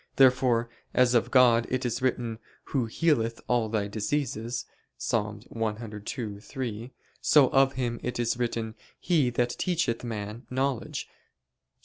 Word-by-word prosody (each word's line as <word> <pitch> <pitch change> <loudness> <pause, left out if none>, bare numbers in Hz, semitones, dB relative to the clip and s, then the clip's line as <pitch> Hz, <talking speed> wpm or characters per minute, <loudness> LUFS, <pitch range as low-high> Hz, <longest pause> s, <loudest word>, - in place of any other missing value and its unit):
Therefore 125 -3 +4 0.3
as 125 -1 +5
of 120 - +3
God 120 -3 +5
is 130 0 -1
it - - -8
written: 120 -3 -1 0.3
"Who 130 -4 +2
healeth 115 -4 +1
all 120 -3 +2
thy 105 -2 0
diseases" 120 +2 -2 0.3
(Ps. - - -3
102:3); 110 +1 -4 0.3
so 140 -4 +6
of 135 0 +4
Him 120 -2 -2
is 125 0 -3
it - - -11
written: 115 -2 -1 0.3
"He 155 -8 +2
that 120 0 0
teacheth 165 -11 0
man 110 0 -5
knowledge" 130 -1 -1
(Ps. - - -31
120 Hz, 130 wpm, -28 LUFS, 110-130 Hz, 0.3 s, so